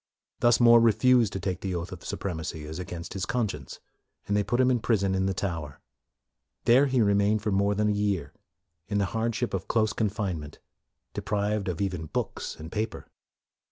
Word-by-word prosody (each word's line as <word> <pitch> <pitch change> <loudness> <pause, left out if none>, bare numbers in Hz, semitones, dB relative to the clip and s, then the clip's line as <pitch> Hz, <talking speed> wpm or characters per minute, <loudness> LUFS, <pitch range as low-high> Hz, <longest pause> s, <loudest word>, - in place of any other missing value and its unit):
Thus 120 0 +4
More 120 -1 +8
refused 115 0 +4
to 95 - -3
take 90 0 -3
the 95 -2 -2
oath 85 0 -4
of - - -9
supremacy 80 -4 -4
as 80 +3 -6
against 85 -1 -6
his 95 - -3
conscience, 100 - -3 0.5
and 100 - +1
they 105 - +3
put 120 +5 -1
him 130 0 +4
in 125 - +2
prison 100 -4 +1
in 95 0 +1
the 95 - 0
Tower. 80 -7 -4 0.9
There 130 +4 +6
he 130 -3 +2
remained 100 +1 +2
for 105 - 0
more 100 +1 +2
than 105 +1 +1
a - - +2
year, 100 -8 -1 0.5
in 100 0 -1
the 100 - +2
hardship 115 +1 -1
of 95 -1 -3
close 110 -1 +1
confinement, 95 -9 -2 0.6
de - - -4
prived 105 0 -1
of 90 -1 -2
even 90 -5 -2
books - - -3
and 80 +2 -9
paper. 110 +1 -3
100 Hz, 190 wpm, -27 LUFS, 90-110 Hz, 0.9 s, More